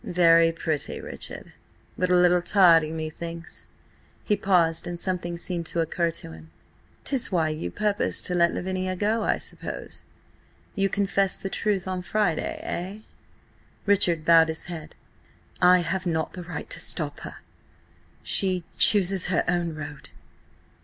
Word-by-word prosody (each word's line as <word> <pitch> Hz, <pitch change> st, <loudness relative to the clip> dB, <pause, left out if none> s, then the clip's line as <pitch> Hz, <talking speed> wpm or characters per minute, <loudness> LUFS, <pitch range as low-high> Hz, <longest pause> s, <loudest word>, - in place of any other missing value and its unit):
"Very 165 Hz, -1 st, +4 dB
pretty, 160 Hz, -3 st, -3 dB
Richard, -, -, -7 dB, 0.4 s
but 185 Hz, -, -1 dB
a 180 Hz, -, +4 dB
little 180 Hz, 0 st, +4 dB
tardy, 170 Hz, -4 st, +4 dB
methinks." 165 Hz, +1 st, -7 dB, 0.6 s
He 210 Hz, -, +1 dB
paused, 175 Hz, -5 st, +2 dB
and 175 Hz, -1 st, -5 dB
something 175 Hz, -2 st, -3 dB
seemed 170 Hz, -1 st, -4 dB
to 170 Hz, -, -3 dB
occur 165 Hz, +1 st, 0 dB
to 160 Hz, -, -6 dB
him. 80 Hz, 0 st, -13 dB, 0.5 s
"'Tis 260 Hz, -5 st, 0 dB
why 165 Hz, -4 st, +1 dB
you 155 Hz, -, -4 dB
purpose 210 Hz, -, 0 dB
to 180 Hz, -, -1 dB
let 170 Hz, -1 st, +3 dB
Lavinia 185 Hz, 0 st, -3 dB
go, 215 Hz, +4 st, 0 dB
I -, -, +1 dB
suppose? -, -, -6 dB, 0.7 s
You 195 Hz, -2 st, 0 dB
confess 195 Hz, -1 st, +1 dB
the 195 Hz, -, -6 dB
truth 200 Hz, -4 st, -1 dB
on 185 Hz, -1 st, -3 dB
Friday–eh?" 190 Hz, 0 st, -2 dB, 0.8 s
Richard 180 Hz, -6 st, +2 dB
bowed 165 Hz, -1 st, +6 dB
his 160 Hz, 0 st, -3 dB
head. 170 Hz, -3 st, -8 dB, 0.7 s
"I 180 Hz, 0 st, +6 dB
have 180 Hz, +2 st, -2 dB
not 160 Hz, -2 st, -1 dB
the 180 Hz, -, -7 dB
right 175 Hz, 0 st, -7 dB
to -, -, -2 dB
stop -, -, -2 dB
her. -, -, -8 dB, 0.9 s
She–chooses 185 Hz, 0 st, +3 dB
her 180 Hz, -2 st, +1 dB
own 175 Hz, -2 st, -1 dB
road." 145 Hz, -1 st, -9 dB
175 Hz, 140 wpm, -25 LUFS, 165-190 Hz, 0.9 s, bowed